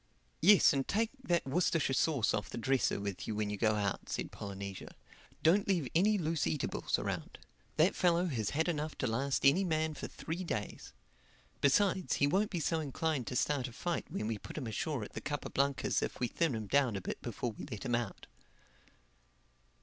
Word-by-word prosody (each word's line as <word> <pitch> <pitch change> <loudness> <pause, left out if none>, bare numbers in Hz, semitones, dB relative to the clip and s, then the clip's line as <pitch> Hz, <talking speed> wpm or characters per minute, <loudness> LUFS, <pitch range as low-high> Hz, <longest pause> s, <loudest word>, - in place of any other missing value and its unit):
"Yes 195 0 +7
and 135 -1 -1
take 220 +2 +1
that 175 -7 +1
Worcestershire 150 0 +1
sauce 135 -4 +2
off 105 - -2
the - - -6
dresser 130 -2 +1
with 100 -2 -4
you 110 - -2
when 105 -1 -1
you - - -1
go 110 0 +2
out," 100 -2 -2
said - - -3
Polynesia. 100 -1 -7 0.5
"Don't 190 +6 +4
leave 175 -9 +1
any 205 +5 +4
loose 165 -4 0
eatables 150 - -1
around. - - -4 0.4
That 160 +5 +4
fellow 175 -1 +3
has 115 - -1
had 160 +3 0
enough 155 -3 -2
to - - -1
last 130 +4 0
any 165 +8 +6
man 160 -3 0
for - - -6
three 170 +3 -5
days. 105 - -4 0.7
Besides, 190 +6 +3
he 140 - +3
won't 195 +9 +2
be 175 - -2
so 165 +1 0
inclined 150 -2 -2
to 125 - -3
start 135 0 +1
a - - -9
fight 175 +7 -3
when - - -3
we 110 -1 -2
put - - -9
him 145 - -3
ashore 120 +3 -2
at - - -9
the - - -5
Capa 145 -1 -4
Blancas 140 0 +1
if - - -3
we 125 - +1
thin 160 0 0
him 110 -1 -4
down 130 0 +2
a 95 - -3
bit - - -5
before 120 0 -3
we 105 - -9
let 105 +4 -6
him 120 - -1
out." 120 -4 -2
140 Hz, 200 wpm, -33 LUFS, 115-165 Hz, 0.7 s, Yes